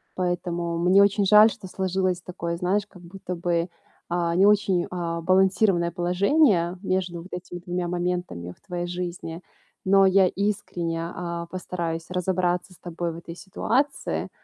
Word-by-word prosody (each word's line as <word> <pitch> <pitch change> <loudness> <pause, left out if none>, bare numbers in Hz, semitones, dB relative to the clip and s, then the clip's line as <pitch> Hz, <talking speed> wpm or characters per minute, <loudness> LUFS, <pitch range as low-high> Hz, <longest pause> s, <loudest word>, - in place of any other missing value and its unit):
Поэтому 175 -2 -2
мне 185 +3 +5
очень 200 0 +2
жаль, 210 +2 +8
что 190 - -9
сложилось 185 -1 -1
такое, 170 -1 -4
знаешь, 195 +4 0
как 180 -3 -16
будто 180 0 -7
бы, 170 0 -1 0.4
а, 170 -1 0
не 195 +3 +5
очень, 200 -4 +3
а, 170 -2 -3
балансированное 185 -1 +3
положение 180 - +2
между 185 -3 -1
вот 180 - -11
этими 180 0 -6
двумя 175 0 -3
моментами 175 - -3
в - - -34
твоей 175 0 -3
жизни. 175 -1 -5 0.4
Но 195 0 +6
я 190 0 +5
искренне, 180 -5 -2
а, 170 -1 -5
постараюсь 170 -2 -4
разобраться 180 0 -1
с - - -20
тобой 170 -1 -4
в - - -8
этой 170 0 -9
ситуации. 255 +9 -1
180 Hz, 150 wpm, -25 LUFS, 170-190 Hz, 0.4 s, жаль